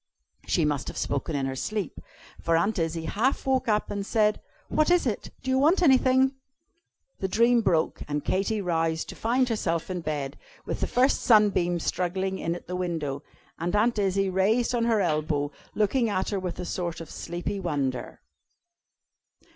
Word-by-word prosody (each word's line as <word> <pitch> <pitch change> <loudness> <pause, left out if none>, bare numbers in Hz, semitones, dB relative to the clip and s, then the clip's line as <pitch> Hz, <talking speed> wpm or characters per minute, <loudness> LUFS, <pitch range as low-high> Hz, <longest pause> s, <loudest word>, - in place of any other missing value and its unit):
She 165 - +2
must 145 -2 -1
have - - -6
spoken 140 +2 -2
in 135 -1 0
her 135 0 -3
sleep, 210 +7 -3 0.4
for 165 0 +2
Aunt 200 +4 +1
Izzie 165 0 -2
half 225 - 0
woke 265 -2 +1
up, 210 -1 +1
and 200 -1 -2
said: 210 0 +1 0.3
"What 310 +1 +2
is 355 -3 +4
it? 225 -5 -2
Do 260 - -1
you 260 - +3
want 330 +7 +4
anything?" 265 -2 +4 0.9
The 190 - -1
dream 235 +4 +4
broke, 165 -7 +1
and 145 0 -3
Katy 200 +3 0
roused, 165 -3 -1
to - - -7
find 250 +3 +1
herself 185 -7 -1
in 180 -1 -3
bed, 145 -3 -4 0.3
with - - -3
the - - 0
first 255 +3 +2
sunbeams 190 -6 +3
struggling 190 +1 -1
in 165 +1 -1
at 175 - -9
the 180 - -5
window, 160 -6 -2 0.4
and 175 +4 -1
Aunt 220 +1 +2
Izzie 195 -1 +1
raised 215 +7 +2
on 235 -1 +1
her 225 -3 +2
elbow, 150 -4 0 0.2
looking 220 +3 +2
at 190 -2 -1
her 200 - 0
with 185 -2 -4
a - - -3
sort 175 -2 -3
of 165 -2 -9
sleepy 175 +4 -4
wonder. 140 -8 -3
190 Hz, 180 wpm, -27 LUFS, 165-225 Hz, 0.9 s, is